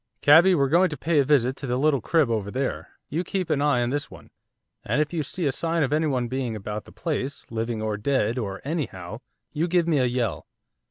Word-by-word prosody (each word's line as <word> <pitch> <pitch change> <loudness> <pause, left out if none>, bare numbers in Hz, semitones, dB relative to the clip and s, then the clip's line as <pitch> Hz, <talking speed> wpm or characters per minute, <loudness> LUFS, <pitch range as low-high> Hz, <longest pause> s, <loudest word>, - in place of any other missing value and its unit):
'Cabby, 170 +6 +7
we're 140 -4 +2
going 175 +6 +4
to 150 - -6
pay 165 -2 +1
a - - +5
visit 130 -2 +2
to 135 - -6
the 125 0 0
little 140 -1 +2
crib 155 +4 +2
over 105 -3 -1
there, 130 +4 -3 0.2
you 165 +5 -2
keep 185 -2 -3
an 140 - +1
eye 140 -4 +2
on 120 - -1
this 145 +1 -2
one. - - -14 0.5
And - - 0
if 150 +2 0
you 165 - 0
see 155 +4 -3
a 140 - +2
sign 165 +2 0
of 140 +1 0
anyone 145 -6 +1
being 125 -2 -3
about 105 0 -5
the - - -14
place, 140 -4 -3
living, 115 -1 -2
or 110 -1 -1
dead, 120 0 0
or 100 -4 -4
anyhow 115 - -4 0.3
you 160 +3 0
give 175 -1 +2
me 155 -4 +2
a 130 - +3
yell. 120 -4 -2
140 Hz, 230 wpm, -25 LUFS, 120-155 Hz, 0.5 s, Cabby